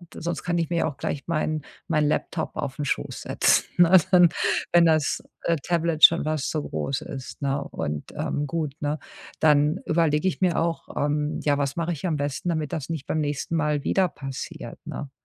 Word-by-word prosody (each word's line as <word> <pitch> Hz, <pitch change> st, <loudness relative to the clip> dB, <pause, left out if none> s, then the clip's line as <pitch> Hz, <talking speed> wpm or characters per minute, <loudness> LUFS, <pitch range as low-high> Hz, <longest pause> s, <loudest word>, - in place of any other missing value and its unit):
sonst 170 Hz, 0 st, -3 dB
kann 175 Hz, -1 st, 0 dB
ich 165 Hz, -2 st, 0 dB
mir 170 Hz, -2 st, +1 dB
auch 145 Hz, -3 st, -6 dB
gleich 140 Hz, -, -3 dB
mein 155 Hz, -2 st, -1 dB, 0.3 s
mein 155 Hz, -4 st, +2 dB
Laptop 160 Hz, +2 st, -2 dB
aufn 145 Hz, -1 st, -3 dB
Schoss -, -, -2 dB
setzen, -, -, +3 dB
ne? 175 Hz, +1 st, +7 dB
Dann, 175 Hz, -2 st, +7 dB, 0.4 s
wenn 170 Hz, 0 st, +6 dB
das, 155 Hz, -2 st, +2 dB, 0.2 s
äh, 170 Hz, -, +2 dB
Tablet 170 Hz, 0 st, -1 dB
schon 170 Hz, -, +8 dB
fast 155 Hz, -2 st, -1 dB
so 155 Hz, -2 st, -2 dB
groß 80 Hz, -, -3 dB
ist, 135 Hz, +1 st, -8 dB
ne? 140 Hz, 0 st, 0 dB
Und, 75 Hz, 0 st, -4 dB
ähm, 145 Hz, 0 st, -2 dB
gut, 155 Hz, -2 st, -2 dB
ne? 150 Hz, +1 st, -1 dB, 0.4 s
Dann 150 Hz, +1 st, +4 dB
überlege 160 Hz, 0 st, +2 dB
ich 185 Hz, -, -2 dB
mir 180 Hz, -2 st, +2 dB
auch, 165 Hz, 0 st, -1 dB
ähm, 150 Hz, +1 st, 0 dB
ja, 145 Hz, -1 st, +2 dB
was 140 Hz, -1 st, -1 dB
mache 170 Hz, 0 st, -1 dB
ich 170 Hz, +2 st, -3 dB
am 165 Hz, -, 0 dB
besten, 145 Hz, +3 st, -2 dB
damit 155 Hz, -4 st, -2 dB
das 150 Hz, -2 st, -4 dB
nicht 160 Hz, -4 st, -4 dB
beim 155 Hz, -, -1 dB
nächsten 150 Hz, +2 st, -2 dB
Mal 150 Hz, -3 st, 0 dB
wieder 190 Hz, -1 st, +2 dB
passiert, 135 Hz, -5 st, -7 dB
ne? 140 Hz, -, -6 dB
155 Hz, 195 wpm, -25 LUFS, 145-170 Hz, 0.4 s, schon